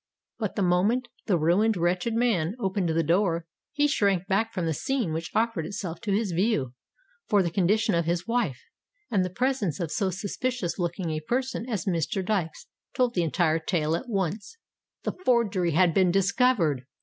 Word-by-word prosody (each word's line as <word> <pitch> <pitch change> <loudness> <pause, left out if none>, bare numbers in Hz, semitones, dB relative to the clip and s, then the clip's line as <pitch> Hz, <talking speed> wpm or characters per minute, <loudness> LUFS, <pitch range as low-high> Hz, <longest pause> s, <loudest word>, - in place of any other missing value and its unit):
But 215 -4 -2
the 200 - +1
moment 205 +8 +2 0.2
the 185 - +3
ruined, 185 +7 +2
wretched 180 +6 0
man 215 -7 +1
opened 190 -4 0
the 165 +1 +1
door, 170 0 +1 0.3
he 295 0 +2
shrank 200 -10 +1
back 210 +4 +1
from 180 -6 -2
the 160 - 0
scene 240 - -1
which 165 +1 -3
offered 225 -6 +1
itself 175 -1 -5
to 210 - -2
his 200 -1 +1
view; 170 - 0 0.5
for 205 -2 +3
the 170 - -2
condition 205 +4 +2
of 170 -1 +1
his 170 +1 -1
wife, 230 - 0 0.5
and 195 -5 +2
the 185 - -2
presence 230 - -1
of 170 -3 -3
so 195 -4 0
suspicions 200 +2 -3
looking 175 -1 -2
a 155 - -2
person 250 +7 -2
as 210 -7 -2
Mr. 170 +1 -1
Dykes 180 -6 -2 0.3
told 250 -2 +2
the 180 - +1
entire 165 0 +1
tale 160 -1 0
at 245 +9 -5
once—the 200 - -5
forgery 205 - +2
had 175 +1 +4
been 185 0 +4
discovered! 190 - +2
190 Hz, 175 wpm, -26 LUFS, 170-225 Hz, 0.5 s, had